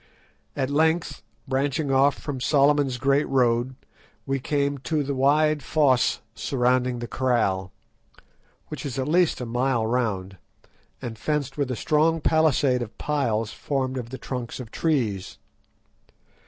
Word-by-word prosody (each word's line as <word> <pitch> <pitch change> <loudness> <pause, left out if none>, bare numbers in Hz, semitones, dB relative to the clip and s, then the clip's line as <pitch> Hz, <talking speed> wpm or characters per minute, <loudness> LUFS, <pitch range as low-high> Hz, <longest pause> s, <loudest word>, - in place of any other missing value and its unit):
At 135 0 -1
length, 160 +3 +1 0.3
branching 140 +2 0
off 135 +1 +3
from 135 -4 -5
Solomon's 140 -2 +3
Great 140 +3 +2
Road, 125 -1 +1 0.5
we 135 0 -1
came 140 +1 -1
to 150 +2 -1
the 140 0 -2
wide 150 +3 +3
fosse 135 -6 +2
surrounding 125 +2 0
the 120 0 -5
kraal, 110 -8 0 1.0
which 150 -4 -6
is 135 -2 -5
at 130 0 -1
least 170 -2 +2
a - - -3
mile 120 0 0
round, 105 -6 -1 0.7
and 115 -3 -6
fenced 145 -1 -2
with 140 -3 -1
a 125 - -2
strong 155 +7 +2
palisade 145 -5 +2
of 115 -2 -7
piles 115 -7 -1
formed 130 -2 -2
of 115 -2 -7
the 130 - -6
trunks 125 -2 -5
of 120 -4 -8
trees. 115 - -1
135 Hz, 140 wpm, -25 LUFS, 120-145 Hz, 1.0 s, off